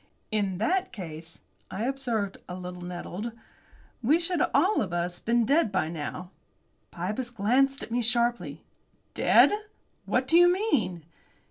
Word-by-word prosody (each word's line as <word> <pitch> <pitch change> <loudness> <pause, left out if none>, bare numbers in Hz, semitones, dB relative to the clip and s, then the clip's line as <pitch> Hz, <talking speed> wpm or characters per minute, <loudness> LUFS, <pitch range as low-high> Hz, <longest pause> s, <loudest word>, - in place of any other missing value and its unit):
"In 200 -4 0
that 365 - 0
case," 165 -6 -8 0.3
I 195 +4 -4
observed, 240 -7 -2
a 180 - -5
little 180 -1 -7
nettled, 180 +5 -5 0.7
"we 290 +8 +4
should 345 -1 -1
all 365 +10 +3
of 185 - -3
us 175 +1 -1
been 235 0 +2
dead 285 -3 +3
by 180 -5 0
now." 170 +3 -6 0.6
Pybus 210 +8 -3
glanced 250 +5 +1
at - - -9
me 240 +1 +1
sharply. 235 - 0 0.5
"Dead! - - +5 0.6
What 255 +1 +1
do 330 +4 +6
you 350 0 +7
mean?" 240 - 0
220 Hz, 140 wpm, -27 LUFS, 180-270 Hz, 0.7 s, you